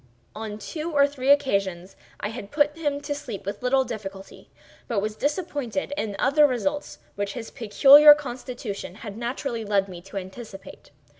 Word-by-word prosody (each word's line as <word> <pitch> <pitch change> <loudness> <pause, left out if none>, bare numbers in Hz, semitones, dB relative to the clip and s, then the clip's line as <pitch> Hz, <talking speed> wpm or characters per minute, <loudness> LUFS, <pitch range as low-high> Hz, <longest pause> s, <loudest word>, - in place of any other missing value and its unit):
On 215 -1 -6
two 310 - -5
or 285 -2 +5
three 275 -2 -3
occasions 195 -10 +1 0.2
I 205 - -3
had 220 -3 -8
put 295 +2 +2
him 290 -3 -2
to 290 0 -3
sleep 250 -9 -7
with 200 +1 -5
little 265 +2 +3
difficulty, 195 -5 -8 0.4
but 230 -4 0
was 210 +1 -3
disappointed 290 - -2
in 215 -8 -3
other 295 +3 +4
results 290 +4 -2 0.2
which 200 0 -3
his 230 -3 -7
peculiar 280 +7 +8
constitution 245 -8 -6
had 205 -2 -6
naturally 240 0 -3
led 200 -2 +1
me 180 -2 -9
to 195 +2 -9
anticipate. 195 +1 -9
240 Hz, 160 wpm, -25 LUFS, 200-285 Hz, 0.4 s, peculiar